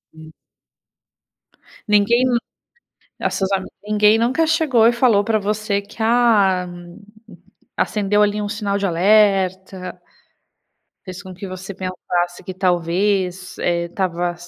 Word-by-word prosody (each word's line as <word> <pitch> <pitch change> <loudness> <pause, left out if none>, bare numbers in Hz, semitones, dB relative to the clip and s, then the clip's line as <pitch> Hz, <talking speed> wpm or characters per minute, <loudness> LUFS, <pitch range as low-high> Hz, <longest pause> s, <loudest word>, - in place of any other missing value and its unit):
Hum. 160 0 -13 1.6
Ninguém 210 +4 +3 1.0
das - - -1
sua 190 - 0
a, 190 - -7 0.2
ninguém 210 +1 +4
nunca 260 +8 +1
chegou 300 -9 +3
e 240 - +3
falou 235 -4 +3
pra 220 0 +1
você 205 0 -1
que: 200 +2 -17
"Ah, 215 -6 +3 1.1
acendeu 210 0 +1
ali 210 0 0
um 205 - -3
sinal 205 -2 -2
de 200 - -2
alerta"? 190 0 +1 1.0
Fez 185 0 -8
com 185 -1 -10
que 195 +2 -8
você 185 +1 -8
pensasse 180 -1 -3
que 185 - -6
talvez, 185 +1 -1
eh, 170 0 0
estava, 175 -1 -2
200 Hz, 120 wpm, -20 LUFS, 185-215 Hz, 1.6 s, ninguém